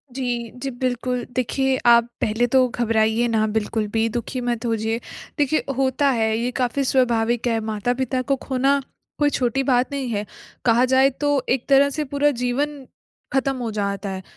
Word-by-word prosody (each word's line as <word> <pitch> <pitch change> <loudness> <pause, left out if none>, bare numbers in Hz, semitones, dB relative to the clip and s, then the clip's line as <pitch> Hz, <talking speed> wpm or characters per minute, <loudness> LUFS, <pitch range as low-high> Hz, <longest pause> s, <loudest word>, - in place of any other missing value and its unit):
जी। 240 -3 -3
जी, 270 - -1
बिल्कुल। 250 0 -2
देखिए 265 +1 +1
आप 235 -1 +7 0.2
पहले 225 +3 +1
तो 255 +1 +4
घबराइए 225 0 +1
ना 220 -1 +1
बिल्कुल 215 0 -1
भी 225 0 +2
दुखी 240 +2 -4
मत 240 -1 -2
होइए 225 0 -1 0.4
देखिए, 295 +1 +1
होता 270 +1 +2
है 220 -3 +1
ये 245 +2 -1
काफ़ी 255 +3 0
स्वाभाविक 240 -2 +1
है 225 -1 +1
माता-पिता 245 +4 -1
को 275 +1 0
खोना, 275 +1 +2 0.4
कोई 295 0 +4
छोटी 265 0 0
बात 255 +1 +2
नहीं 270 -3 -3
है। 210 -2 -2 0.4
कहा 240 +2 +4
जाए 265 +1 +4
तो 290 0 0
एक 255 -1 0
तरह 280 +1 +5
से 300 +2 -2
पूरा 285 +2 +1
जीवन 265 +3 -2 0.5
ख़त्म 270 0 +1
हो 235 -3 -3
जाता 200 -1 -2
है, 190 -1 -5
245 Hz, 170 wpm, -22 LUFS, 225-270 Hz, 0.5 s, आप